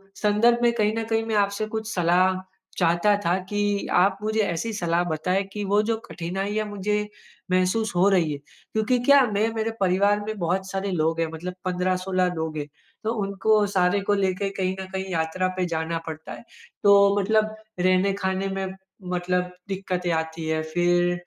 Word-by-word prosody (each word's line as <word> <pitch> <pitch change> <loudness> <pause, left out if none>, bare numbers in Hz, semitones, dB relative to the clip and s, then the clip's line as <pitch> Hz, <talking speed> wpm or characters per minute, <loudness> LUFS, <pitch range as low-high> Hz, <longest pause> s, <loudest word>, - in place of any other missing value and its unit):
संदर्भ 215 +3 +3
में 235 - +5
कहीं 215 -2 +2
न 225 - -1
कहीं 225 0 +1
मैं 225 -1 -1
आपसे 200 +2 -1
कुछ 220 0 -3
सलाह 180 +1 +3 0.4
चाहता 175 +4 +3
था 175 +2 +3
कि, 205 -1 0
आप 190 +2 +3
मुझे 215 +1 0
ऐसी 200 +3 -1
सलाह 175 -3 0
बताएँ 180 +5 0
कि 210 - -3
वो 205 +2 +3
जो 225 - +2
कठिनाइयाँ 195 +5 -3
मुझे 205 0 -1 0.5
महसूस 185 +4 +1
हो 180 +3 +4
रही 175 -6 +2
है - - -4
क्योंकि 220 - -2
क्या 280 +1 +7 0.2
मैं 215 +2 +3
मेरे 225 0 -1
परिवार 200 +2 +3
में 215 0 -3
बहुत 185 +2 -1
सारे 195 0 -2
लोग 165 -1 0
हैं, 165 - +1
मतलब 180 +3 -5
15-16 185 0 0
लोग 160 -1 -3
हैं, 145 -1 -4 0.4
तो 220 +1 0
उनको 205 +2 +2
सारे 185 +2 +3
को - - +5
लेके 195 0 0
कहीं 185 0 0
न - - -5
कहीं 190 0 -2
यात्रा 165 +2 0
पे 185 - +1
जाना 165 0 -2
पड़ता 160 0 -7
है। - - -10 0.4
तो 200 0 +6
मतलब 215 +2 +1 0.2
रहने 185 +2 +3
खाने 190 0 -1
में 195 - -1 0.5
मतलब 180 0 -1 0.2
दिक्कतें 185 -2 -2
आती 160 0 -2
हैं 160 0 0
फिर 175 0 +2
190 Hz, 180 wpm, -24 LUFS, 175-205 Hz, 0.5 s, क्या